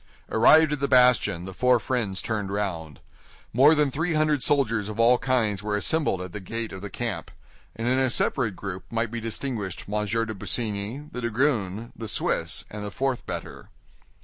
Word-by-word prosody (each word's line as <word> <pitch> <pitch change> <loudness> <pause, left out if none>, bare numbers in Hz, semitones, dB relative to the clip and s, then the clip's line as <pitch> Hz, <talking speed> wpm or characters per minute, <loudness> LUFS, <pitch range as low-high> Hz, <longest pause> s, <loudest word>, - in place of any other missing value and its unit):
Arrived 155 +8 +6
at 150 - -3
the 140 - 0
bastion, 125 -9 +4
the 95 - -7
four 125 +4 +3
friends 110 -7 -1
turned 105 -4 -2
round. 85 -7 -3 0.5
More 140 +7 +6
than 150 -2 +2
three 160 +4 -1
hundred 155 -2 +2
soldiers 115 -8 +1
of 110 +1 -7
all 120 +2 +5
kinds 110 -7 0
were 105 0 -2
assembled 105 - +1
at 90 - -9
the 105 - -5
gate 115 +4 -5
of 95 - -8
the 105 - -6
camp; 120 -2 -4 0.5
and 115 +2 -3
in 130 +1 +2
a 130 -1 +2
separate 115 -4 0
group 95 0 -6
might 115 -1 -1
be 115 0 -4
distinguished 110 -4 -4
M. 105 +1 -1
de 115 +1 -1
Busigny, 110 +6 -3
the 125 - -5
dragoon, 115 -3 -1
the 115 - -6
Swiss, - - -1
and 105 0 -6
the 105 - -4
fourth 130 +3 -2
bettor. - - -6
115 Hz, 185 wpm, -25 LUFS, 105-130 Hz, 0.5 s, Arrived